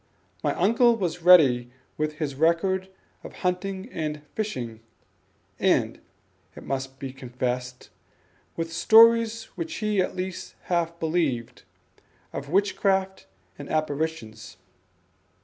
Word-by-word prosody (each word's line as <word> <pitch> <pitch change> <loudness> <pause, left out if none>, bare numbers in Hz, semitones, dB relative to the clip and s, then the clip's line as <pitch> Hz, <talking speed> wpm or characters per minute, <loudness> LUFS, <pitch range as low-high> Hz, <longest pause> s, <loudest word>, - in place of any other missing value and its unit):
My - - 0
uncle 230 +6 +4
was 175 -5 -3
ready 140 -9 +6 0.3
with 155 0 -2
his 150 -2 -4
record 170 +6 +1 0.3
of - - -10
hunting 190 +2 -2
and 150 -2 -4
fishing 125 - -4 0.8
and, - - +1 0.6
it - - -10
must 135 0 -4
be 135 -1 -7
confessed, 125 -1 -4 0.6
with 165 0 -4
stories 230 +3 +5
which 335 -1 -5
he 210 -6 0
at 185 - -2
least 185 0 -5
half 170 -1 -1
believed, 155 -8 -1 0.7
of 140 - -6
witchcraft 190 0 0 0.3
and 145 - -8
apparitions. 155 -7 -3
165 Hz, 110 wpm, -25 LUFS, 135-190 Hz, 0.8 s, ready